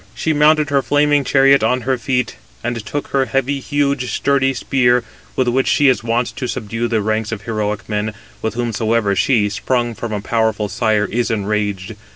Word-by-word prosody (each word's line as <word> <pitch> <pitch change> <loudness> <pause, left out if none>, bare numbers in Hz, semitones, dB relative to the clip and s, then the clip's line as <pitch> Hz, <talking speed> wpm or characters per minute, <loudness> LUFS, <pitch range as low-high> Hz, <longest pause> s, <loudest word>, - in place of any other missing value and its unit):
She 160 +6 0
mounted 150 0 +3
her 140 -1 +3
flaming 145 0 +2
chariot 135 +1 +4
on 125 +3 +1
her 130 +3 0
feet, 125 - -1 0.3
and 120 -2 -3
took 145 +8 -4
her 135 -1 +1
heavy, 135 +1 -1
huge, 140 -2 -1
sturdy 135 -1 +1
spear, 125 -3 +2 0.3
with 130 - +1
which 130 +2 +1
she 145 -2 +4
is 125 - +1
wont 120 +1 -1
to 130 -2 -3
subdue 115 0 -3
the 110 -3 0
ranks 110 +1 -1
of 105 -3 -5
heroic 105 -3 -3
men, 105 0 -2 0.3
with 110 - -2
whomsoever 115 -3 0
she, 110 0 +2
sprung 120 +4 -1
from 115 0 -6
a 105 - -2
powerful 110 0 0
sire, 105 +1 +1
is 120 +4 -1
enraged. 105 -1 -2
120 Hz, 185 wpm, -18 LUFS, 110-135 Hz, 0.3 s, chariot